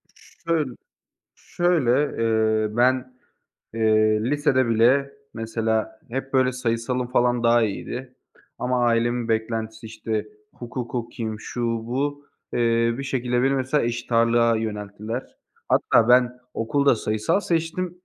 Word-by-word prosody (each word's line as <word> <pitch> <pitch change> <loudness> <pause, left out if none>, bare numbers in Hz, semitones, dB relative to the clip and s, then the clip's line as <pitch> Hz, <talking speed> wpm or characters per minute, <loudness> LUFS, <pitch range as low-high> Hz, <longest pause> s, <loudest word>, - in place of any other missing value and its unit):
Ş - - -21 0.2
şöyl 155 -7 0 0.6
şöyle, 150 -6 +1
eee, 110 -1 +1
ben, 130 +1 +2 0.6
eee, 110 -1 +3
lisede 130 -2 +2
bile 130 +5 +3 0.2
mesela 110 -1 -2
hep, 135 +2 -4
böyle, 130 -1 +3
sayısalım 125 +1 -1
falan 120 -1 +2
daha 115 0 +4
iyiydi. 125 +4 -4 0.4
Ama 125 -1 0
ailemin 120 0 +1
beklentisi, 110 0 -2
işte, 110 -1 -4 0.3
hukuk 120 0 -6
okuyayım, 115 -2 -4
şu, 120 - -5
bu, 130 +5 -2 0.3
eee, 115 -1 +2
bir - - -3
şekilde 125 -2 0
beni 135 +1 +2
mesela 130 +1 0
eşit 120 0 -4
ağırlığa 115 0 +4
yönelttiler. 105 +2 -5 0.3
Hatta 115 - +3
ben 125 0 +5 0.2
okulda 140 +4 +2
sayısal 110 - 0
seçtim. 175 +1 -2
120 Hz, 120 wpm, -23 LUFS, 110-130 Hz, 0.6 s, ben